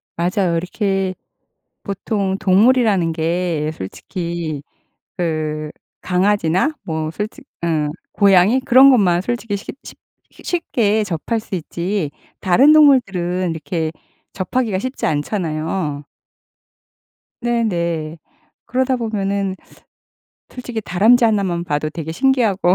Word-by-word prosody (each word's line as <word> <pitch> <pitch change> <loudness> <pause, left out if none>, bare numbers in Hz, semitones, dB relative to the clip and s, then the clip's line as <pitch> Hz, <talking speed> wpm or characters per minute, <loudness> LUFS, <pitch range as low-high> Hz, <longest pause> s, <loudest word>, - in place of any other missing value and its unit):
맞아요. 175 +1 0
이렇게 195 +1 -1 0.7
보통 195 -1 -2
동물이라는 200 -3 +3
게 165 -1 -1
솔직히 165 - -5 0.5
그 155 -3 -2 0.3
강아지나 185 - +1
뭐 160 -1 -3
솔직 215 - -6 0.2
응 155 -3 0 0.2
고양이 200 +5 +4
그런 260 +2 +7
것만 190 -9 +4
솔직히 230 -1 -2
쉽 200 - -8
쉽 - - -11 0.3
쉬 - - -17
쉽게 220 - 0
접할 200 +5 -2
수 215 - -7
있지 175 0 -3 0.3
다른 245 +11 +5
동물들은 190 - +3
이렇게 160 0 -3 0.4
접하기가 210 +1 -1
쉽지 255 +3 -3
않잖아요. 155 -1 -2 1.4
네네. 170 -9 -1 0.5
그러다 260 +1 0
보면은 200 -4 -2 0.9
솔직히 245 -3 -6
다람쥐 215 +6 +4
하나만 195 -6 +1
봐도 155 -2 -2
되게 160 -1 -5
신기하고 215 -5 +2
190 Hz, 235 characters per minute, -19 LUFS, 165-220 Hz, 1.4 s, 그런